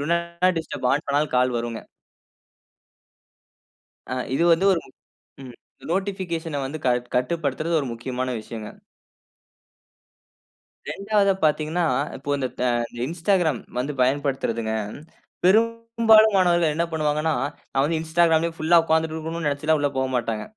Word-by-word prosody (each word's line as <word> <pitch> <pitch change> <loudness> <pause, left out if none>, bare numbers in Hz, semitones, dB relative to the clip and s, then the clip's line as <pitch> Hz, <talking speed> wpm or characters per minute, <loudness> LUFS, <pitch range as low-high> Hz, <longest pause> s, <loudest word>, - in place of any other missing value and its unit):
'Two 145 - -3
not 170 +1 0
disturb' 140 -5 -3
on 145 +3 -1
பண்ணாலும் 145 0 0
கால் 125 -1 +2
வருங்க! 115 -1 -5 2.3
அ, - - 0 0.2
இது 170 - +2
வந்து 170 +4 +1
ஒரு 175 - +2
மு - - -18 0.5
ம், 125 -2 -10 0.4
நோட்டிபிகேஷன 175 -6 -2
வந்து 140 +4 -5
கட் 125 0 +1
கட்டுப்படுத்துறது 155 +4 0
ஒரு 140 - -4
முக்கியமான 125 +2 -4
விஷயங்க! 110 0 -8 2.2
2வதா 200 0 +1
பார்த்தீங்கனா, 155 +3 +1 0.3
இப்போ 140 +2 -9
இந்த 130 -2 -1
த - - 0 0.3
இந்த 120 - -10
Instagram 175 -2 +1 0.2
வந்து 135 +4 -1
பயன்படுத்துறதுங்க. 130 -4 0 0.7
பெரும்பாலும் 225 +1 +4
மாணவர்கள் 175 -4 +3
என்ன 170 +2 +1
பண்ணுவாங்கன்னா, 155 0 0 0.4
நான் 135 0 +2
வந்து 160 +2 0
Instagram-லே 165 0 +2
ஃபுல்லா 165 +2 +4
உட்கார்ந்துட்டு 160 0 +1
இருக்கனும்னு 160 0 -3
நெனச்சுலாம் 150 +2 +1
உள்ள 145 0 +1
போகமாட்டாங்க. 125 -4 -1
155 Hz, 125 wpm, -23 LUFS, 135-170 Hz, 2.3 s, பெரும்பாலும்